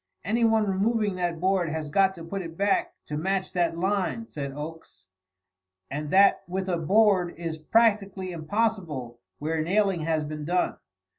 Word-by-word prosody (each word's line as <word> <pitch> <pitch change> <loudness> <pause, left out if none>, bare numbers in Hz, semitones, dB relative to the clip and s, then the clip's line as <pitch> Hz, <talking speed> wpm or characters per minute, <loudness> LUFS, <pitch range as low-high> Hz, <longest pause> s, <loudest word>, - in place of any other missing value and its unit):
"Anyone 225 +1 +3
removing 205 +2 +1
that 175 -2 -1
board 185 -1 +1
has 155 -1 -4
got 190 +3 +3
to 170 - -9
put 195 +4 -4
it 165 -2 -8
back 200 0 +1
to 150 - -4
match 190 +3 -1
that 170 -2 +1
line," 200 +5 -1
said 140 -9 -5
Oakes, 150 - -9 0.9
"and 150 +2 -4
that 195 +3 +5
with 190 +1 -3
a 180 -2 0
board 185 +1 +3
is 165 -2 -4
practically 200 0 +2
impossible 160 - -2 0.2
where 155 +2 -1
nailing 195 +2 +2
has 160 -1 0
been 150 0 -5
done. 180 +4 0
180 Hz, 155 wpm, -26 LUFS, 160-200 Hz, 0.9 s, that